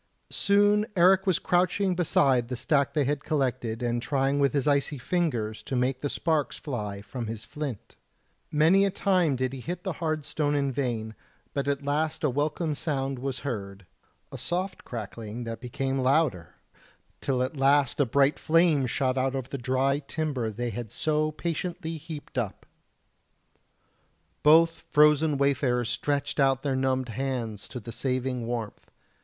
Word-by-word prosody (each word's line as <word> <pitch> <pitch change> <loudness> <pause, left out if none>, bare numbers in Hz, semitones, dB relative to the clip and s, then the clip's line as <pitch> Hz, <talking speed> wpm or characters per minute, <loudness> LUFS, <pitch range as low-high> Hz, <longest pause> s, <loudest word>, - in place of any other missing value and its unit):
Soon 205 +1 +3
Eric 190 +2 +5
was 185 -4 +4
crouching 185 +2 +1
beside 135 -8 +2
the 125 - -3
stack 140 +4 +1
they 150 - +3
had 145 +1 -1
collected 125 -6 -1
and 120 0 0
trying 135 +2 +1
with 140 0 +3
his 140 -2 0
icy 140 0 +2
fingers 120 -8 -1
to 135 - -4
make 125 +1 0
the 145 - -1
sparks 160 -2 0
fly 105 -8 -5
from 120 +1 -5
his 110 0 -6
flint; 140 -2 -6 0.5
many 160 +6 +4
a 200 - +3
time 180 -6 +2
did 130 0 -1
he 135 - -6
hit 175 +8 -5
the 190 -3 -2
hard 155 -3 -1
stone 145 -1 0
in 140 -1 +1
vain, 120 -5 -2 0.4
but 140 0 -2
at 140 0 -1
last 155 +3 -1
a 150 - +2
welcome 150 +4 -1
sound 135 -3 -2
was 135 0 -3
heard 100 -7 -5 0.5
a - - -7
soft 185 +2 -3
crackling 115 0 -6
that 115 0 -6
became 135 +2 -2
louder, 130 - +1 0.7
till 130 -2 +1
at 130 +4 -3
last 140 0 +3
a - - +6
bright 140 +4 +3
flame 160 -5 +3
shot 130 +1 0
out 135 +1 0
over 130 -1 -4
the 140 - -4
dry 130 +2 +1
timber 140 -5 -2
they 120 +3 -3
had 115 -1 -6
so 155 0 0
patiently 170 +1 -4
heaped 150 -3 -6
up. 110 -5 -4 1.8
Both 165 +2 +5
frozen 150 0 +4
wayfarers 130 -4 +1
stretched 145 +4 -1
out 135 -1 +3
their 140 -2 0
numbed 130 -1 0
hands 115 -4 -3
to 125 - -7
the 115 +1 -8
saving 125 -1 -2
warmth. 115 -3 -5
135 Hz, 160 wpm, -27 LUFS, 125-155 Hz, 1.8 s, a